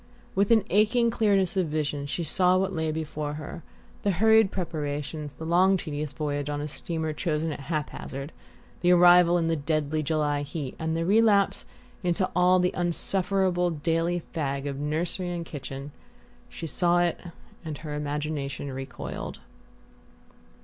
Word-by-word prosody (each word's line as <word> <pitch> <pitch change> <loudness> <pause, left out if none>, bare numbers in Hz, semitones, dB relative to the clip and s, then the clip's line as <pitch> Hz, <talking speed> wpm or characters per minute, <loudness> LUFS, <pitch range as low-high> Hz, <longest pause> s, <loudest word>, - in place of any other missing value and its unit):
With 200 +1 +2
an 225 -3 +5
aching 230 +4 +3
clearness 200 -5 +2
of 185 -3 +1
vision 150 -2 -2
she 170 +4 -2
saw 180 +3 +3
what 190 +1 0
lay 160 -2 -1
before 155 -1 -4
her 155 +3 -7 0.4
the 205 - 0
hurried 220 +2 +5
preparations, 150 -4 -4
the 160 - -7
long 185 +3 +4
tedious 150 -4 -4
voyage 145 -1 -3
on 145 0 -2
a 150 - -3
steamer 160 +1 -3
chosen 155 0 -1
at - - -8
haphazard, 145 -1 -5 0.5
the 175 - +3
arrival 175 0 +7
in 170 - +1
the 165 0 +1
deadly 155 0 -1
July 150 -1 0
heat, 145 -2 -5
and 160 0 -1
the 165 - -1
relapse 205 0 +3 0.3
into 180 0 +1
all 180 +1 +5
the 180 0 +1
insufferable 180 +1 0
daily 165 +2 0
fag 140 -4 -2
of 140 -1 -4
nursery 165 +5 -2
and 170 -1 -4
kitchen 140 -1 -7 0.6
she - - -7
saw 175 +2 +3
it 175 -1 +1 0.4
and 155 -3 -5
her 150 - -4
imagination 145 -1 -3
recoiled. 135 0 -6
165 Hz, 150 wpm, -27 LUFS, 150-180 Hz, 0.6 s, arrival